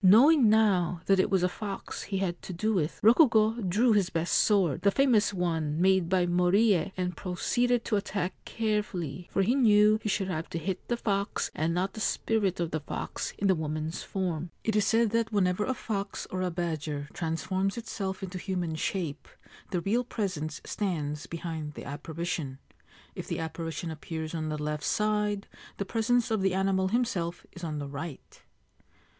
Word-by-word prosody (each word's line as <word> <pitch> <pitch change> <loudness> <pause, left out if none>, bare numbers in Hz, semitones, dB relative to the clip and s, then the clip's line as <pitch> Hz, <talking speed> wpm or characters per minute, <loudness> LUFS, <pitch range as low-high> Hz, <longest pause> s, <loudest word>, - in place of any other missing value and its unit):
Knowing 240 - +7
now 190 -6 +3
that 195 -1 +4
it 190 - +3
was 190 -3 +2
a - - +4
fox 195 +2 -6
he 195 - -3
had 180 -3 -2
to - - -7
do 215 +6 0
with, 160 -5 -1
Rokugo 230 -2 +5
drew 215 +5 +3
his 200 -3 +2
best 165 -1 -1
sword, 190 -8 +3
the 200 - +4
famous 235 -2 +3
one 165 -5 -1
made 190 -1 +3
by 185 -1 +3
Moriye, 180 +1 +3
and 180 -1 -1
proceeded 240 +8 0
to 210 - +1
attack 200 -2 -2
carefully, 200 -8 -2
for 195 - +2
he 230 +6 +3
knew 215 -4 +5
he 215 - -2
should 195 -1 0
have 165 -3 -3
to - - -3
hit 185 +3 -4
the 240 - 0
fox 200 -3 -1
and 160 +2 0
not 190 +2 0
the - - -7
spirit 210 -3 0
of 170 -2 -1
the 160 - -1
fox 150 - -4
in 200 - -2
the 190 - +5
woman's 155 0 -3
form. 175 -3 -3
(It 220 - 0
is 210 -1 +3
said 225 -1 +3
that 230 0 +1
whenever 195 -1 +2
a 260 - -1
fox 200 -4 -4
or 185 - -2
a 185 - 0
badger 160 -4 -3
transforms 185 +5 -1
itself 195 -4 -4
into 185 -1 -5
human 180 -4 -2
shape 155 -2 -3 0.4
the 180 -3 -1
real 225 +7 +1
presence 180 -10 -3
stands 150 -7 -2
beside 160 -3 -5
the - - -8
apparition. 155 -1 -4 0.6
If - - -7
the - - -2
apparition 165 0 -4
appears 160 0 -5
on 155 -1 -2
the 155 - -2
left 150 0 -3
side, 210 -1 0 0.3
the 200 - -2
presence 230 +3 +1
of 220 -3 +1
the 190 -1 +2
animal 190 0 +2
himself 190 -6 -1
is 175 - -11
on 155 -2 -3
the 145 -1 -4
right.) 145 +1 -8
185 Hz, 185 wpm, -29 LUFS, 165-210 Hz, 0.6 s, Knowing